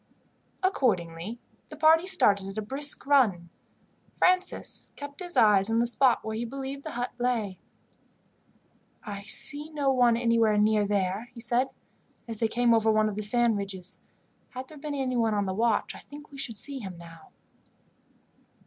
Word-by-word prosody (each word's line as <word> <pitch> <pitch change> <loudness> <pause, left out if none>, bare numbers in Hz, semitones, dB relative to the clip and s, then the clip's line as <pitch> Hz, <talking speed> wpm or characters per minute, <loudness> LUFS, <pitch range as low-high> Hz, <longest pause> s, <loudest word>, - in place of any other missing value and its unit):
Accordingly, 205 - -1 0.3
the 305 - -10
party 320 +3 +4
started 200 - +3
at 195 +2 -8
a - - -1
brisk 275 +7 -1
run. 210 -12 +2 0.7
Francis 370 0 0
kept 285 -1 -9
his 355 -1 -4
eyes 205 -2 +4
on 225 - +1
the 235 - +2
spot 245 +1 +2
where 220 0 -4
he 225 - -3
believed 270 +3 -6
the - - -6
hut 245 0 -3
lay. 230 -6 -1 1.4
"I 200 -2 -6
see 295 +8 +5
no 290 -3 0
one 245 -2 +3
anywhere 230 -3 +2
near 210 0 +2
there," 200 +3 -1
he - - -10
said, 245 +3 0 0.6
as 225 -2 -6
they 225 - +2
came 240 +1 +2
over 225 -1 +3
one 215 0 +2
of 205 - -6
the 210 - -3
sand 230 +1 +3
ridges. 195 -2 -4 0.5
"Had 255 +1 -8
there 305 - -12
been 295 0 -5
anyone 245 -5 0
on 205 -1 0
the 190 - -3
watch 225 +1 0
I - - -10
think 295 0 -13
we 280 - -12
should 230 -5 -4
see 275 +4 0
him 190 -6 -8
now." 165 -2 -14
230 Hz, 170 wpm, -27 LUFS, 205-270 Hz, 1.4 s, see